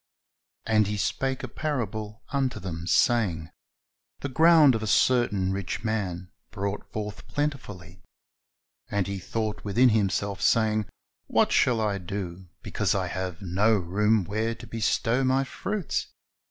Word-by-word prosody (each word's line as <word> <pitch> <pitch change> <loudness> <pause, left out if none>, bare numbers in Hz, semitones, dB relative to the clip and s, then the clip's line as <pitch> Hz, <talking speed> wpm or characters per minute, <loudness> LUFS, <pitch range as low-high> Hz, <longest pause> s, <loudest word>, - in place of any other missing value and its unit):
"And 110 -2 +3
He 105 +1 -2
spake 130 +6 -1
a - - -3
parable 110 -7 -4
unto 135 -3 -1
them, 85 -2 -6
saying, 90 -9 +2 0.7
The 140 - -3
ground 160 0 +6
of 110 - -2
a 110 - -3
certain 105 -5 +2
rich 95 +3 -3
man 95 -5 -3 0.2
brought 100 -1 -4
forth 105 -1 -6
plentifully; 105 - -4 0.9
and 100 -2 0
he 100 -1 -4
thought 110 +3 -3
within 120 +5 +4
himself, 100 -2 0
saying. 110 -2 +2 0.4
What - - +2
shall 120 -3 +3
I 105 -2 0
do, 90 -1 -6 0.2
because - - 0
I - - -1
have 95 0 -4
no 100 +5 +2
room 105 +3 +2
where 110 +4 -2
to 120 +1 -11
bestow 115 +2 0
my 130 +1 +2
fruits? 195 +6 -3
105 Hz, 140 wpm, -26 LUFS, 95-120 Hz, 0.9 s, ground